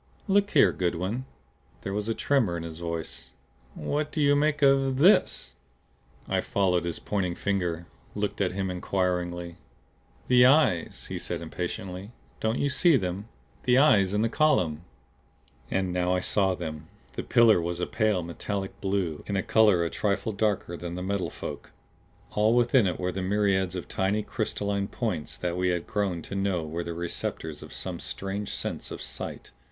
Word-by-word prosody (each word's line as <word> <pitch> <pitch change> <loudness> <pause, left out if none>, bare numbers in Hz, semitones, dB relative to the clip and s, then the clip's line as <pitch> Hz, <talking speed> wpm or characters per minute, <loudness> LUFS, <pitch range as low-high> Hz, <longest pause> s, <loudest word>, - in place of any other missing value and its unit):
"Look 200 0 +3
here, - - +5
Goodwin!" 95 +8 -2 0.6
There 95 - -3
was 105 +2 -2
a 115 - 0
tremor 120 -12 +1
in 85 - -5
his 80 -1 -7
voice. 80 -7 -5 0.4
"What 150 - -2
do - - -3
you 145 -1 +4
make 150 0 +1
of 135 -1 +4
THIS?" 180 +9 +4 0.7
I - - +1
followed 90 -3 +1
his 85 - -2
pointing 90 -4 -2
finger; 90 -4 -1 0.3
looked 105 0 -2
at 90 -2 +1
him 95 -1 -2
inquiringly. 90 -2 -2 0.7
"The 125 -1 +6
eyes!" 135 - +3
he - - -3
said - - -3
impatiently. 90 +4 -5 0.3
"Don't 110 +2 0
you 145 - +1
see 155 +2 +4
them? 95 0 -3 0.4
The 125 0 +5
eyes 105 -10 +5
in 105 - +2
the - - +3
column!" 90 - +2 0.8
And 95 -1 0
now 90 0 +1
I - - +1
saw 95 0 +2
them. 80 -3 -6 0.3
The - - -3
pillar 115 -6 +5
was 85 +1 -3
a 90 - 0
pale 110 -5 +1
metallic 95 +3 -5
blue, 95 -6 -1
in 100 -1 0
color 105 -6 +4
a 85 - -3
trifle 100 +1 0
darker 100 -4 -1
than 85 0 -6
the 90 - -4
Metal 100 0 -1
Folk. - - -7 0.6
All 110 +2 +3
within 120 -2 +4
it 90 - -2
were 90 0 -1
the 95 - -4
myriads 95 -1 +1
of 90 - -5
tiny 100 +3 0
crystalline 100 -3 -2
points 100 -10 -3
that 90 -1 -2
we 90 0 0
had 90 -1 -1
grown 95 -5 -1
to - - -8
know 95 -4 0
were 85 +3 -3
the 85 -1 -5
receptors 80 -2 -4
of - - -10
some - - -5
strange 100 +1 -4
sense - - -4
of - - -7
sight. - - -6
95 Hz, 170 wpm, -27 LUFS, 90-110 Hz, 0.8 s, The